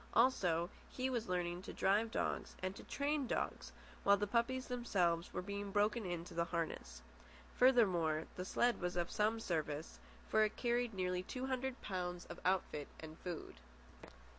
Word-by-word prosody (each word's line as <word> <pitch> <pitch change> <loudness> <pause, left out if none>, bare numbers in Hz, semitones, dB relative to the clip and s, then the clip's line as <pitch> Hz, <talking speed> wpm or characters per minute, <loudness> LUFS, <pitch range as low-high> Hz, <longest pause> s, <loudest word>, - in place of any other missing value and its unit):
Also, 180 -8 +3 0.2
he 260 +1 -1
was 235 -5 -1
learning 175 -1 -1
to - - -7
drive 210 +4 +2
dogs - - -2
and 185 +1 -1
to - - -9
train 285 -1 0
dogs; - - -2 0.3
while 200 0 +6
the 205 - 0
puppies 245 +4 +1
themselves 180 -9 +1
were - - -3
being 200 +1 -4
broken 210 +1 +2
in 175 -1 -3
to - - -10
the 170 0 +1
harness. 160 - -3 0.5
Furthermore, 180 -12 +4
the 180 - -3
sled 240 +5 +2
was 180 0 -1
of 175 -1 0
some 220 +2 +2
service, 155 - -2 0.3
for 215 - +4
it 215 0 0
carried 240 -2 0
nearly 180 -1 0
two 255 +7 -4
hundred 265 0 -2
pounds 180 -2 -3
of - - -8
outfit 180 -5 +1
and 160 0 -8
food. 175 - -6
195 Hz, 165 wpm, -38 LUFS, 175-235 Hz, 0.5 s, while